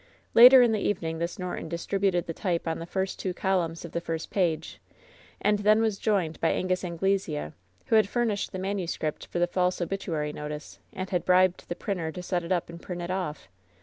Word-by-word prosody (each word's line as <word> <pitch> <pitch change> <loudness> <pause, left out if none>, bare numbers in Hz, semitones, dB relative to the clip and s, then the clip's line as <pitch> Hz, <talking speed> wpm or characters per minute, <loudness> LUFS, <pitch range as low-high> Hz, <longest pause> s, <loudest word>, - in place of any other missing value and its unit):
Later 250 +2 +10
in 235 - +3
the 215 - +1
evening 165 -6 -2
this 170 +1 -3
Norton 180 -3 -5
distributed 180 +1 0
the 165 - -4
type 175 -1 -2
on 160 - -1
the 165 - -7
first 190 +1 -2
two 185 -2 -3
columns 175 -4 -1
of 170 - -9
the 170 - -2
first 165 -1 -4
page, 175 -5 -1 0.6
and 210 0 +2
then 210 +1 +4
was 220 -3 0
joined 190 -7 0
by 165 - +3
Angus 185 0 0
Anglesea, 175 - -1 0.3
who - - +2
had 215 -3 +4
furnished 230 -4 -1
the 185 - -5
manuscript 185 -5 -3
for - - -5
the 175 - +3
false 180 +1 0
obituary 165 -5 -2
notice, 150 0 -7
and 185 +1 -6
had 180 -3 0
bribed 185 0 +3
the 175 - -2
printer 180 -5 -3
to 180 - -7
set 180 -1 -1
it 170 - -6
up 175 -2 +1
and 170 0 -10
print 175 -1 -5
it 175 - -4
off. 180 - -3
180 Hz, 210 wpm, -27 LUFS, 170-195 Hz, 0.6 s, Later